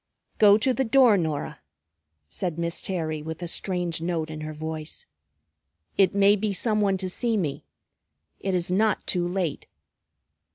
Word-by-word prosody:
"Go 205 Hz, -1 st, +7 dB
to 255 Hz, +4 st, +1 dB
the 265 Hz, -, 0 dB
door, 245 Hz, -2 st, +5 dB
Norah," 155 Hz, -4 st, -2 dB, 0.7 s
said 155 Hz, -, -3 dB
Miss 170 Hz, 0 st, -2 dB
Terry 160 Hz, -5 st, -2 dB
with 160 Hz, +3 st, -6 dB
a -, -, -3 dB
strange 175 Hz, -2 st, -2 dB
note 165 Hz, -2 st, -2 dB
in 155 Hz, 0 st, -7 dB
her 155 Hz, 0 st, -5 dB
voice. 155 Hz, 0 st, -6 dB, 0.9 s
"It 195 Hz, 0 st, +3 dB
may 200 Hz, +1 st, +5 dB
be 210 Hz, 0 st, -1 dB
some 215 Hz, +2 st, +1 dB
one 195 Hz, -2 st, +2 dB
to 185 Hz, 0 st, -3 dB
see 225 Hz, +4 st, -1 dB
me. 155 Hz, -8 st, -3 dB, 0.7 s
It 195 Hz, -1 st, -1 dB
is 175 Hz, 0 st, 0 dB
not 210 Hz, +2 st, +1 dB
too 175 Hz, -1 st, 0 dB
late." 175 Hz, -4 st, -2 dB
180 Hz, 160 wpm, -25 LUFS, 160-205 Hz, 0.9 s, Go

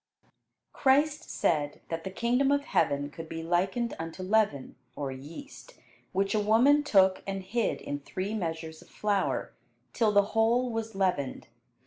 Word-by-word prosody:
Christ 290 Hz, +4 st, +2 dB
said 145 Hz, -3 st, 0 dB
that 165 Hz, 0 st, -3 dB
the 190 Hz, -, -4 dB
kingdom 245 Hz, +7 st, +1 dB
of 285 Hz, 0 st, +2 dB
heaven 145 Hz, 0 st, +1 dB
could 165 Hz, +1 st, -9 dB
be 165 Hz, 0 st, -5 dB
likened 190 Hz, +8 st, 0 dB
unto 165 Hz, +3 st, -6 dB
leaven 195 Hz, -9 st, +1 dB, 0.2 s
(or 140 Hz, -2 st, -3 dB
yeast), 165 Hz, -, -10 dB, 0.4 s
which 195 Hz, +1 st, 0 dB
a 215 Hz, -, +2 dB
woman 235 Hz, +8 st, +5 dB
took 190 Hz, -9 st, +4 dB
and 195 Hz, -1 st, -3 dB
hid 230 Hz, +4 st, -1 dB
in 145 Hz, 0 st, -4 dB
three 185 Hz, +8 st, -4 dB
measures 160 Hz, -5 st, -4 dB
of -, -, -17 dB
flour, 205 Hz, -2 st, -1 dB, 0.4 s
till 220 Hz, -3 st, +2 dB
the 205 Hz, 0 st, +3 dB
whole 235 Hz, +3 st, +2 dB
was 225 Hz, -1 st, -4 dB
leavened. 180 Hz, -9 st, -1 dB
195 Hz, 150 wpm, -29 LUFS, 165-235 Hz, 0.4 s, woman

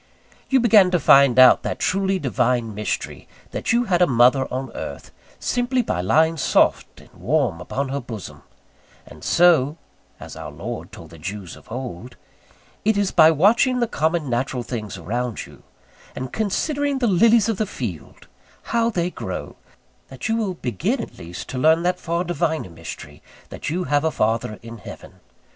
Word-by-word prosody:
You 265 Hz, -, +4 dB
began 215 Hz, -6 st, +5 dB
to 180 Hz, -1 st, +1 dB
find 140 Hz, -4 st, +6 dB
out 130 Hz, -1 st, +8 dB
that -, -, -3 dB
truly 195 Hz, 0 st, 0 dB
Divine 125 Hz, -6 st, 0 dB
mystery, 105 Hz, +1 st, -4 dB, 0.2 s
that -, -, -2 dB
you 235 Hz, +1 st, +3 dB
had 180 Hz, -6 st, +1 dB
a 180 Hz, -, +6 dB
mother 125 Hz, +1 st, +3 dB
on 130 Hz, 0 st, -4 dB
earth, -, -, -7 dB, 0.3 s
simply 245 Hz, +1 st, 0 dB
by 90 Hz, -, -2 dB
lying 160 Hz, -, +2 dB
soft 135 Hz, -, +1 dB
and -, -, -20 dB
warm 130 Hz, -, -1 dB
upon 135 Hz, +7 st, -3 dB
her 140 Hz, +1 st, -2 dB
bosom; 115 Hz, -6 st, -9 dB, 0.6 s
and -, -, -14 dB
so 165 Hz, -4 st, +4 dB, 0.4 s
(as -, -, -10 dB
Our -, -, -7 dB
Lord -, -, -7 dB
told -, -, -12 dB
the 85 Hz, -, -13 dB
Jews 95 Hz, +2 st, -6 dB
of -, -, -18 dB
old) 120 Hz, -2 st, -7 dB, 0.7 s
it 220 Hz, 0 st, +2 dB
is 200 Hz, -2 st, +1 dB
by 160 Hz, -2 st, +7 dB
watching 220 Hz, -, +3 dB
the 240 Hz, -, +2 dB
common 160 Hz, -5 st, -1 dB
natural 125 Hz, 0 st, -2 dB
things 110 Hz, -5 st, -6 dB
around 115 Hz, +6 st, -3 dB
you, -, -, -16 dB, 0.5 s
and 130 Hz, 0 st, -6 dB
considering 280 Hz, +7 st, -1 dB
the 255 Hz, -, 0 dB
lilies 225 Hz, +2 st, +4 dB
of 225 Hz, -3 st, -1 dB
the 215 Hz, -, -1 dB
field, 100 Hz, -, -7 dB, 0.5 s
how 230 Hz, 0 st, +2 dB
they 180 Hz, -5 st, -1 dB
grow, -, -, -6 dB, 0.5 s
that -, -, -6 dB
you 225 Hz, -, +1 dB
will 210 Hz, -5 st, -2 dB
begin 120 Hz, -, -2 dB
at -, -, -7 dB
least 85 Hz, +1 st, -8 dB
to 130 Hz, -, -4 dB
learn 160 Hz, +4 st, +4 dB
that 180 Hz, +1 st, 0 dB
far 170 Hz, +1 st, -2 dB
Diviner 160 Hz, -, -2 dB
mystery, 80 Hz, -3 st, -10 dB, 0.3 s
that -, -, -6 dB
you 175 Hz, +4 st, -1 dB
have 145 Hz, 0 st, +1 dB
a 160 Hz, -, +2 dB
Father 110 Hz, -5 st, -1 dB
in 115 Hz, 0 st, -9 dB
Heaven. -, -, -12 dB
150 Hz, 175 wpm, -22 LUFS, 120-190 Hz, 0.7 s, out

